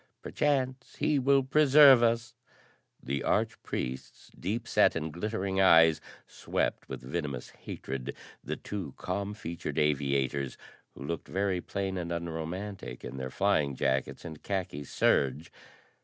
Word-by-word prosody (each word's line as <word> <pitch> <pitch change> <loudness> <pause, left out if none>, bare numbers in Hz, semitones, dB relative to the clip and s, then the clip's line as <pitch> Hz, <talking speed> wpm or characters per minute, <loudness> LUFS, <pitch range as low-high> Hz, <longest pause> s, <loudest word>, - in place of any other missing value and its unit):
Perchance 130 -3 -1
he 150 -2 +1
will 135 +1 +4
preserve 140 -2 +7
us." 115 0 +1 0.7
The 70 +2 -2
arch - - 0
priest's 65 +1 -5
deep 115 +5 -4
set 105 - +4
and 80 -2 -3
glittering 95 +1 -1
eyes 80 -4 +6 0.2
swept - - -2
with 65 -2 -6
venomous 70 -2 -4
hatred 65 -1 -6 0.3
the - - -3
two 95 -10 -6
calm 100 +3 -3
featured 85 -5 -5
aviators, 70 -2 0 0.4
who - - -9
looked 85 +2 -4
very 95 -2 0
plain 95 -1 -3
and 85 -1 -4
unromantic 85 +4 -5
in 65 +2 -7
their 65 -1 -4
flying 75 -5 +1
jackets 65 +4 -1
and 80 -2 -8
khaki 90 -7 -3
serge. 70 +5 +1
85 Hz, 130 wpm, -30 LUFS, 70-105 Hz, 0.7 s, preserve